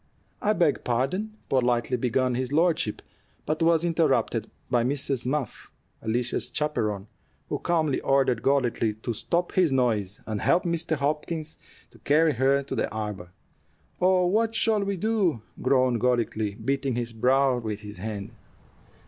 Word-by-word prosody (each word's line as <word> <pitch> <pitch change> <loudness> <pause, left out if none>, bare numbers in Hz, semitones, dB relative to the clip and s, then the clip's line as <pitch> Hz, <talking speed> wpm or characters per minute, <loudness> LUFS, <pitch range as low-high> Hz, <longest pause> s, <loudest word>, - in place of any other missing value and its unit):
"I 210 - +2
beg 170 -8 +1
pardon 180 - -1
" - - -37
politely 125 -1 +2
began 125 +1 +1
his 130 +1 -2
lordship, 160 -8 +1 0.4
but 155 +2 -2
was 165 0 +4
interrupted 165 -1 +1 0.2
by 120 -2 +2
Mrs. 135 -1 0
Muff, 140 -3 -3 0.3
Alicia's 120 +2 -1
chaperon, 105 -10 -1 0.4
who - - -2
calmly 160 -5 +1
ordered 135 -3 +2
Golightly 120 -5 +1
to 115 +2 -4
stop 170 +10 -1
his 180 -5 +3
noise, 110 -7 0
and 110 -2 -3
help 175 +1 +3
Mr. 170 -1 -1
Hopkins 155 +2 -2 0.4
carry 155 +2 +4
her 135 +3 +3
charge 140 0 -5
to - - -2
the - - -1
arbor. 105 -5 -5 0.7
"Oh, 185 0 +4
what 220 +5 +1
shall 220 -2 +2
we 200 -1 -2
do?" 190 - 0 0.2
groaned 130 -3 +2
Golightly, 115 -4 0
beating 135 +1 -1
his 120 -1 -3
brow 130 +2 +3
with 110 -3 -4
his 105 -2 -9
hand. 105 +1 -5
135 Hz, 150 wpm, -26 LUFS, 115-165 Hz, 0.7 s, was